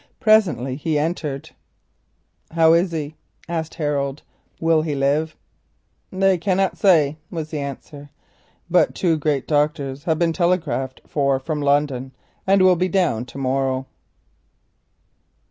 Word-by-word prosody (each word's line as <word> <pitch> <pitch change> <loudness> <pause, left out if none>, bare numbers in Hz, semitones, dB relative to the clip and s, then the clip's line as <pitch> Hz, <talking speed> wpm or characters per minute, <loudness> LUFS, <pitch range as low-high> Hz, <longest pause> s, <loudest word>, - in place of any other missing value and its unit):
Presently 185 - +3
he 155 +1 -2
came 155 +3 +1
in. 140 -5 -5 1.1
"How 165 -1 +5
is 170 +2 +2
he?" 155 -2 -4 0.3
asked 165 -2 -4
Harold. 145 -2 -2 0.4
"Will 165 -1 +3
he 155 -2 -2
live?" 145 +3 0 0.8
"They 190 -1 +2
cannot 190 +1 +1
say," 155 -6 +3
was 160 -3 -5
the 155 - -3
answer. 140 +1 -8 0.6
"But - - +2
two 170 -3 +1
great 150 -3 -1
doctors 145 -2 -1
have 160 -2 +1
been 165 0 +1
telegraphed 165 -7 -1
for 140 -2 +1
from 150 +2 -4
London, 140 -2 0 0.3
and 195 0 +4
will 185 -1 +6
be 180 +2 0
down 165 - +1
to 125 +2 -12
morrow." 135 0 -1
155 Hz, 130 wpm, -21 LUFS, 140-170 Hz, 1.1 s, will